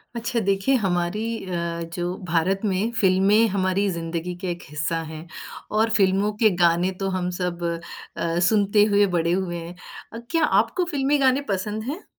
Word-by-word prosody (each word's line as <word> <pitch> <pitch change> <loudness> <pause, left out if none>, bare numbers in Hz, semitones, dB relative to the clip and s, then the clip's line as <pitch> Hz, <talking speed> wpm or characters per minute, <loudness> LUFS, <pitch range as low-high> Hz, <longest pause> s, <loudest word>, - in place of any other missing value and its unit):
अच्छा 235 +1 -1
देखिए 195 +5 +1
हमारी 175 +1 0 0.2
अ, 170 -2 -3
जो 175 +1 -2
भारत 175 +4 +1
में, 200 +3 0
फ़िल्में 195 +4 +4
हमारी 190 +1 +1
ज़िंदगी 170 +1 -4
के 185 - -3
एक 175 0 -6
हिस्सा 155 +3 -2
हैं 160 +1 -9 0.5
और 220 +1 +3
फ़िल्मों 195 +1 +2
के 215 - +7
गाने 170 +2 +3
तो 195 -1 -1
हम 180 -1 -2
सब 175 -1 -3 0.5
अ, 170 0 -1
सुनते 205 -1 +3
हुए 205 0 +5
बड़े 170 0 +1
हुए 180 -1 -1
हैं। 170 +1 -8 0.4
अ, - - -6
क्या 330 -1 +2
आपको 230 - +1
फ़िल्मी 285 0 +1
गाने 265 0 +3
पसंद 210 +3 -2
हैं? 295 - -6
190 Hz, 165 wpm, -23 LUFS, 175-215 Hz, 0.5 s, के